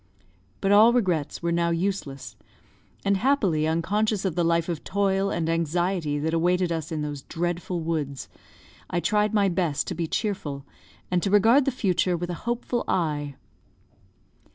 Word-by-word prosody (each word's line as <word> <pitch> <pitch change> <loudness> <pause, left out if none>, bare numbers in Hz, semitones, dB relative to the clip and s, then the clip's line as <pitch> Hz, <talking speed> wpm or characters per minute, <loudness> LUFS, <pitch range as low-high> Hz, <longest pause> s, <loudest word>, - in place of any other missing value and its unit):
But 195 - +1
all 215 +3 +7
regrets 180 - 0
were 170 - 0
now 170 0 +1
useless; 170 -6 -3 0.7
and 200 0 +3
happily 195 - +2
unconscious 200 +6 0
of 190 - 0
the 175 - 0
life 170 0 +1
of 170 -4 -4
toil 195 0 +1
and 165 -4 -1
anxiety 165 -1 0
that 160 +2 -1
awaited 175 +1 +2
us 160 -2 -3
in 155 -2 -2
those 145 -2 -5
dreadful 175 +2 -3
woods, 150 -4 -3 0.6
I 175 - 0
tried 210 +3 +1
my 200 -1 +4
best 170 -5 0
to - - -2
be 165 0 -3
cheerful, 155 -10 -3 0.5
and 180 -1 +2
to 195 - 0
regard 225 +7 +5
the 275 - +1
future 185 -6 +1
with 175 +1 -4
a 175 +7 -6
hopeful 240 0 -1
eye. 150 -5 -1
175 Hz, 160 wpm, -25 LUFS, 160-200 Hz, 0.7 s, all